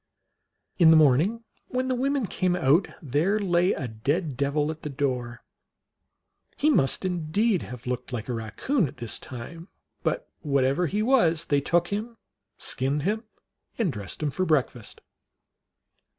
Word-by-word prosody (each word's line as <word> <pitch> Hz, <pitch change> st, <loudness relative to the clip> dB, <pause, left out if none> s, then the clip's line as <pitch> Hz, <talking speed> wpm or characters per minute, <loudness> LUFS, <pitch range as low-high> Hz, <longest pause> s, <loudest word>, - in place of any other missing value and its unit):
In 165 Hz, -2 st, +7 dB
the 160 Hz, -, +8 dB
morning, 155 Hz, -, +3 dB, 0.2 s
when 255 Hz, 0 st, -1 dB
the 260 Hz, -, +1 dB
women 270 Hz, 0 st, 0 dB
came 180 Hz, -1 st, 0 dB
out, 170 Hz, +2 st, +3 dB, 0.2 s
there 155 Hz, -, +1 dB
lay 180 Hz, -3 st, +2 dB
a 130 Hz, -, -4 dB
dead 140 Hz, -, -2 dB
devil 145 Hz, +3 st, 0 dB
at 160 Hz, 0 st, -9 dB
the 150 Hz, -, -5 dB
door. 125 Hz, -4 st, -3 dB, 1.1 s
He 305 Hz, -, +3 dB
must 140 Hz, -, +2 dB
indeed 180 Hz, +4 st, +1 dB
have 125 Hz, 0 st, -9 dB
looked 125 Hz, +1 st, -4 dB
like 120 Hz, -3 st, -4 dB
a 125 Hz, -, -2 dB
Eaccoon 145 Hz, -, -1 dB
this 120 Hz, -2 st, -4 dB
time; 160 Hz, +8 st, -9 dB, 0.3 s
but -, -, -1 dB
whatever 140 Hz, +3 st, +1 dB
he 210 Hz, +6 st, -1 dB
was, 170 Hz, -, +3 dB
they 145 Hz, -1 st, +2 dB
took 175 Hz, +4 st, +1 dB
him, 220 Hz, +3 st, -4 dB, 0.4 s
skinned 140 Hz, +3 st, -1 dB
him, 215 Hz, +5 st, -1 dB, 0.5 s
and 195 Hz, -, 0 dB
dressed 100 Hz, -, -6 dB
him 150 Hz, -, 0 dB
for 165 Hz, +7 st, -1 dB
breakfast. 135 Hz, -, -1 dB
155 Hz, 150 wpm, -26 LUFS, 135-195 Hz, 1.1 s, the